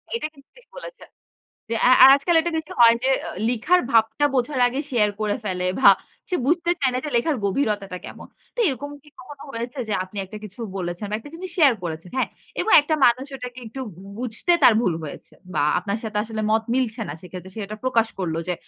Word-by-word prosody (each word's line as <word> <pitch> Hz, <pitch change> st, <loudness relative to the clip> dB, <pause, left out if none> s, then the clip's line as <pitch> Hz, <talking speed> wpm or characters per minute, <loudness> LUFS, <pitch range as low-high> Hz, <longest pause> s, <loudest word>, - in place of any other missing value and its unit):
এটা 310 Hz, -, -2 dB
কিন্তু 275 Hz, -1 st, -21 dB
ঠিক -, -, -20 dB
বলেছেন। -, -, -10 dB, 0.6 s
যে -, -, 0 dB
আ -, -, +5 dB
আ -, -, +12 dB
আজকাল 335 Hz, +5 st, 0 dB
এটা 345 Hz, +1 st, -2 dB
বেশি 315 Hz, -1 st, -5 dB
হয় 230 Hz, 0 st, +8 dB
যে 265 Hz, -, +3 dB, 0.4 s
লিখার 250 Hz, +10 st, +2 dB
ভাবটা 225 Hz, +5 st, +3 dB
বোঝার 255 Hz, +1 st, 0 dB
আগে 260 Hz, +3 st, -1 dB
শেয়ার 210 Hz, -4 st, +2 dB
করে 210 Hz, +1 st, 0 dB
ফেলে 180 Hz, -2 st, -2 dB
ভা -, -, +9 dB, 0.4 s
সে 360 Hz, -, +1 dB
বুঝতে 340 Hz, +2 st, +2 dB
চায় 265 Hz, -2 st, +3 dB
না -, -, +1 dB
যে -, -, -2 dB
লেখার 285 Hz, +4 st, +1 dB
গভীরতাটা 200 Hz, -4 st, -1 dB
কেমন। -, -, -10 dB, 0.3 s
তো -, -, -23 dB
এরকম 285 Hz, +2 st, -4 dB
কি 300 Hz, -, -19 dB
কখনো 280 Hz, +2 st, -11 dB
হয়েছে 240 Hz, +4 st, -5 dB
যে 210 Hz, -, -2 dB
আপনি 200 Hz, +2 st, -10 dB
একটা 215 Hz, +3 st, -10 dB
কিছু 210 Hz, +3 st, -11 dB, 0.2 s
বলেছেন 175 Hz, +2 st, -4 dB
বা 210 Hz, -, -2 dB
একটা 290 Hz, +6 st, -12 dB
জিনিস 365 Hz, +2 st, -7 dB
শেয়ার 280 Hz, -7 st, +6 dB
করেছেন, 165 Hz, +1 st, -6 dB
হ্যাঁ? 260 Hz, -, +1 dB, 0.3 s
এবং 445 Hz, -, -1 dB
একটা 305 Hz, +2 st, -1 dB
মানুষ 250 Hz, +3 st, +2 dB
ওটাকে 250 Hz, 0 st, -8 dB
একটু 245 Hz, +4 st, -8 dB, 0.2 s
বু 190 Hz, -, -13 dB, 0.2 s
বুঝতে 250 Hz, +8 st, -1 dB
তার 235 Hz, -, +8 dB
ভুল 185 Hz, -8 st, +1 dB
হয়েছে। 145 Hz, -, -10 dB, 0.2 s
বা 145 Hz, -, +1 dB, 0.2 s
আপনার 205 Hz, +1 st, -3 dB
সাথে 210 Hz, -1 st, -3 dB
আসলে 220 Hz, -1 st, -4 dB
মত 220 Hz, 0 st, +3 dB
মিলছে 245 Hz, -3 st, -1 dB
না। -, -, -4 dB
সেক্ষেত্রে 185 Hz, +1 st, -10 dB
সে 220 Hz, -, -6 dB
এটা 215 Hz, +2 st, -7 dB
প্রকাশ 230 Hz, -3 st, +2 dB
করল 170 Hz, -4 st, -2 dB
যে 180 Hz, -, 0 dB
235 Hz, 215 wpm, -23 LUFS, 210-280 Hz, 0.6 s, আ